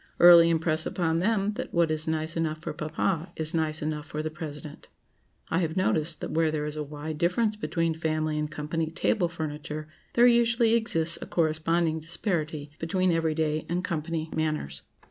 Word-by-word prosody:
Early 170 -1 +9
impress 160 -1 +1
upon 165 -2 0
them 210 +1 +1
that - - -4
what 170 -2 +3
is 155 0 -1
nice 160 +1 -1
enough 160 -2 -1
for 155 - -6
Papa, 165 +2 -2
is 160 -1 -2
nice 155 -2 -1
enough 150 0 -3
for 150 +2 -4
the 155 - -3
President. 150 -1 -8 0.6
I 165 - +1
have 165 0 -2
noticed 160 -4 +1
that - - -4
where 160 0 +2
there 155 -1 -2
is 150 0 -4
a 155 - -3
wide 150 +1 -6
difference 210 +5 +1
between 165 -6 -1
family 155 -1 -1
and 150 0 -2
company 155 +2 -3
table 175 +2 0
furniture, 155 -2 -5 0.3
there 240 - +5
usually 235 -1 +4
exists 170 -8 +2
a - - -6
corresponding 160 0 +1
disparity 155 -3 -3
between 185 +2 +1
every 165 -2 +1
day 155 -1 0
and 175 +1 -1
company 160 -2 -3
manners. 155 - -2
160 Hz, 180 wpm, -27 LUFS, 155-170 Hz, 0.6 s, Early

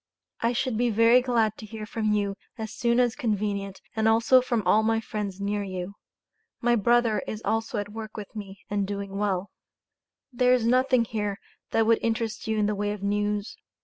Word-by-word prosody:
I 230 +1 +1
should 245 -1 -1
be 245 0 +2
very 230 +3 +5
glad 230 -4 +1
to 220 - -9
hear 215 0 -7
from 215 0 -1
you 205 -1 +1 0.2
as 220 -1 -5
soon 235 +1 +1
as 245 -2 +2
convenient 205 -5 -2
and 220 0 +2
also 230 +3 +5
from 240 -3 -1
all 215 - +5
of 220 - 0
my 225 0 +2
friends 205 -3 -5
near 205 +1 -1
you. 185 -1 -5 0.7
My 240 0 +3
Brother 230 -1 +3
is 215 - -4
also 225 +1 -1
at 205 0 -3
work 220 -1 -7
with 210 +1 -8
me 200 -2 -8
and 200 -1 -1
doing 200 -1 -4
well. 200 -2 -1 0.8
There 250 +1 +4
is 240 -3 0
nothing 255 0 +3
here 210 -2 -2 0.3
that 225 - +2
would 230 0 +4
interest 225 -1 -2
you 220 0 0
in 210 - +2
the 210 - +1
way 205 0 -1
of 205 -1 -8
news. 205 +1 -1
215 Hz, 200 wpm, -26 LUFS, 205-230 Hz, 0.8 s, very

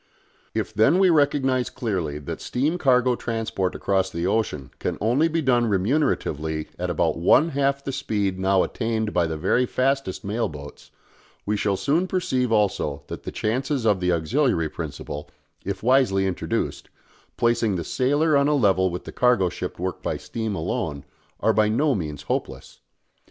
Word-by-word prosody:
If - - -2
then 110 - +4
we 190 -2 +5
recognise 135 -4 +2
clearly 95 - -3
that 75 - -6
steam 150 +8 -1
cargo 125 -4 +3
transport 115 -6 -2
across 95 -1 0
the 85 -1 -3
ocean 95 - -1
can - - -2
only 125 +9 +2
be 165 0 -1
done 120 -3 +3
remuneratively 90 - 0
at - - -2
about - - 0
one 145 - +5
half 140 -1 0
the 135 - -3
speed 105 -8 -2
now 95 0 +3
attained 110 -2 -2
by 85 -2 +2
the 80 -1 -3
very 125 +11 +1
fastest 135 -6 -1
mail 110 +4 -1
boats, 75 -1 -11 0.6
we 105 - 0
shall 100 -1 0
soon 165 - +1
perceive 130 -10 0
also 100 -9 0
that - - -6
the - - -4
chances 130 +3 -1
of 105 -4 +3
the 90 0 +1
auxiliary 85 - +1
principle, 75 -2 -6 0.3
if 100 0 -4
wisely 120 -6 +3
introduced, 95 -2 -2 0.5
placing 115 -3 +2
the 85 - -2
"sailer" 145 - +1
on 140 0 +4
a 150 - +3
level 95 -7 +3
with 90 0 -5
the - - -8
cargo 120 -7 +3
ship - - -6
worked 90 +1 -4
by - - -2
steam 110 -3 -4
alone, 75 -3 -3 0.4
are 110 - +3
by 105 0 +3
no 140 +6 +2
means 75 - -4
hopeless. - - -4
110 Hz, 165 wpm, -24 LUFS, 95-135 Hz, 0.6 s, we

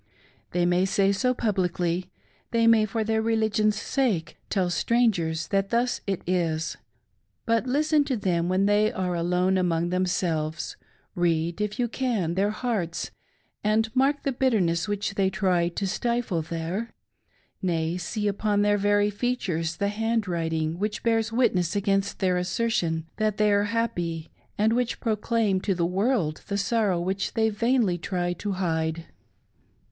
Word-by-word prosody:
They 175 0 +1
may 180 +1 +3
say 195 0 +2
so 250 +6 +1
publicly, 180 -4 -1 0.4
they 230 -1 +2
may, 225 -2 +5
for 220 +2 -2
their 220 0 +1
religion's 215 -1 +1
sake, 230 - -1
tM 185 -3 0
strangers 175 -8 +1
that 195 0 +1
thus 240 +1 0
it 195 -2 -2
is; 165 -3 0 0.7
but 230 +1 +1
listen 300 +3 +3
to 260 -4 -1
them 175 -4 0
when 190 +2 +2
they 205 +1 +3
are 180 -1 -2
alone 180 +2 +1
among 170 -1 0
themselves; 170 -4 -1 0.4
read, 170 +1 0
if 210 +1 -2
you 245 -2 +1
can, 225 -9 -1
their 195 +3 +1
hearts, 215 -7 -2 0.5
and 220 +2 +1
mark 275 +2 +2
the 275 - 0
bitterness 215 -10 +1
which 205 -1 -2
they 195 -1 +2
try 185 -3 +1
to 195 +3 -3
stifle 235 -3 -1
there; 170 +8 -4 0.7
nay, 165 -3 0
see 210 +4 -2
upon 205 0 +1
their 205 0 +3
very 205 +1 +2
features 190 -8 -1
the 200 0 0
handwriting 175 -7 -1
which 210 +1 -2
bears 225 -1 +1
witness 200 -7 +1
against 195 -1 0
their 185 -1 +1
assertion 180 -3 0
that 215 -2 0
they 210 -1 +3
are 205 0 +3
happy 180 -8 -2 0.3
and 220 +2 +3
which 245 0 0
proclaims 215 -3 0
to 195 -1 0
the 170 -1 +1
world 185 - 0
the 200 - -1
sorrow 200 -3 +1
which 190 +3 -2
they 220 -1 +3
vainly 225 -4 +1
try 175 0 -1
to 200 +3 -4
hide 165 -3 -1
200 Hz, 150 wpm, -26 LUFS, 175-225 Hz, 0.7 s, may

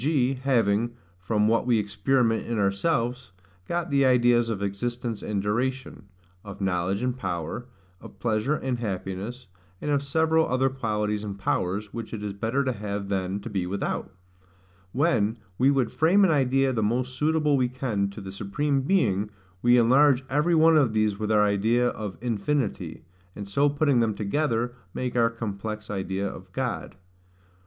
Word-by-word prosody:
g. 135 -2 +2
having, 120 -4 +1 0.2
from 105 +3 +1
what 115 +1 +2
we 120 -2 +4
experiment 110 +3 +1
in 115 - -2
ourselves, 115 - 0 0.3
got 175 -1 -2
the 140 -1 +3
ideas 120 -2 +4
of 110 -4 -2
existence 120 +3 -3
and 100 -2 -2
duration; 125 +1 -2 0.4
of 100 -1 -9
knowledge 95 +2 0
and 125 0 -1
power; 85 +4 -4 0.3
of - - -12
pleasure 115 +5 0
and 130 -4 -2
happiness; 105 +3 -4 0.3
and 150 - -2
of 140 -1 +2
several 160 +3 +2
other 130 +2 +2
qualities 105 -5 -2
and 100 -2 -5
powers, 100 +2 -2
which 115 -1 -5
it 105 - -7
is 105 -1 -3
better 115 +7 -1
to 130 - 0
have 100 -3 -4
than 95 0 -1
to 100 - -8
be 95 -5 -2
without; 100 +2 -3 0.8
when 120 - +1 0.2
we 130 +2 +5
would 135 -5 +1
frame 175 +6 +4
an 180 - +3
idea 135 -2 +2
the 115 - 0
most 125 +4 0
suitable 150 0 +2
we 125 -2 +1
can 120 -6 -1
to 100 +2 -9
the 95 -1 -7
Supreme 135 +9 -1
Being, 110 - +1 0.3
we 120 +1 +5
enlarge 130 +3 +5
every 150 +5 +2
one 160 0 +6
of 135 -7 +3
these 110 -2 +1
with 110 0 -1
our 105 -1 +5
idea 110 +4 +2
of 105 -5 -6
infinity; 115 - -2 0.3
and 100 -1 -7
so 140 +9 +2
putting 140 -3 +2
them 110 -3 +1
together, 120 +1 -1 0.2
make 125 -1 -3
our 115 -1 +4
complex 110 -1 -5
idea 95 0 -2
of - - -9
God. - - -3
115 Hz, 165 wpm, -26 LUFS, 100-135 Hz, 0.8 s, one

